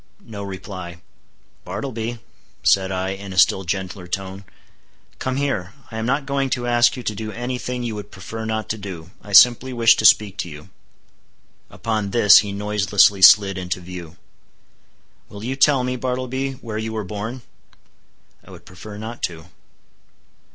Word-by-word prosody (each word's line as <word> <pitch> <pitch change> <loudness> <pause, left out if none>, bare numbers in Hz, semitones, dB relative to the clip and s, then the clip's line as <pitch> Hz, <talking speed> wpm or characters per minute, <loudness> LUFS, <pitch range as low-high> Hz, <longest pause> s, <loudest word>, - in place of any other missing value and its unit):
No 105 -3 -8
reply. 95 -3 -8 0.6
"Bartleby," 120 -3 -4 0.5
said 95 -1 +3
I, 95 0 -2
in 95 0 -6
a - - -9
still 95 +1 +4
gentler 95 0 -4
tone, 95 +2 -5 0.7
"come 130 0 -2
here; 120 -10 -2 0.2
I 110 - -5
am 110 - -2
not 140 +2 0
going 140 -1 -1
to 120 - -5
ask 120 +1 +3
you 125 - -7
to 110 - -2
do 110 +1 -6
any 120 +2 -4
thing 125 -1 -4
you 115 -2 -3
would 105 -1 -7
prefer 110 +4 -8
not 110 -1 -3
to 110 - -3
do—I 95 +3 -10
simply 125 +5 +6
wish 115 -2 +5
to 110 - -1
speak 105 -2 +5
to 85 - -3
you." 75 +4 -12 1.0
Upon 110 -3 -3
this 105 -2 +7
he 100 -1 -3
noiselessly 100 0 +2
slid 95 0 +7
into 90 -1 -3
view. 90 -1 -9 1.1
"Will 100 0 -10
you 130 +3 -3
tell 135 -1 +4
me, 125 0 -2
Bartleby, 130 +1 -3
where 115 -4 -6
you 110 0 -4
were 110 -1 -3
born?" 105 +6 -6 1.0
"I - - -18
would - - -13
prefer 105 +3 -11
not 110 +2 -7
to." 85 0 -9
105 Hz, 165 wpm, -21 LUFS, 95-120 Hz, 1.1 s, this